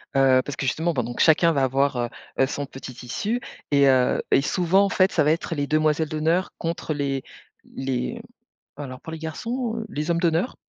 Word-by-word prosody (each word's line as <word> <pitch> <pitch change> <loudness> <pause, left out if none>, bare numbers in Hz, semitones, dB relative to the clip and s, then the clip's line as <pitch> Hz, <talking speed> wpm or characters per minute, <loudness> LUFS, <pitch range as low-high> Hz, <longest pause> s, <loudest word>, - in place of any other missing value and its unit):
Heu, 130 -1 +5
parce 145 - -6
que - - -3
justement 160 +7 0
pendant 120 -4 -2
que - - -2
chacun 165 +1 +5
va 135 -2 +1
avoir, 135 +1 +1
heu 120 -1 -1 0.3
heu, 135 - +5
son 145 +1 -4
petit 135 -1 -9
tissu 200 - -3 0.3
et 140 -1 +5
heu, 130 -2 +3
et - - +5
souvent 180 +6 +2
en 200 - +1
fait 185 +1 +3
ça 155 - +2
va 150 - +3
être 165 +1 -2
les 145 -1 -1
demoiselles 155 0 +1
d'honneur 160 +4 0
contre 165 -2 -3
les 140 -2 -2 0.5
les 135 - -3 0.5
alors 135 -3 -7
pour 160 - -8
les 160 - -6
garçons, 230 +9 -3
heu, 225 - -4
les 150 +1 -2
hommes 170 - +1
d'honneur? 170 +6 +1
155 Hz, 210 wpm, -24 LUFS, 135-170 Hz, 0.5 s, Heu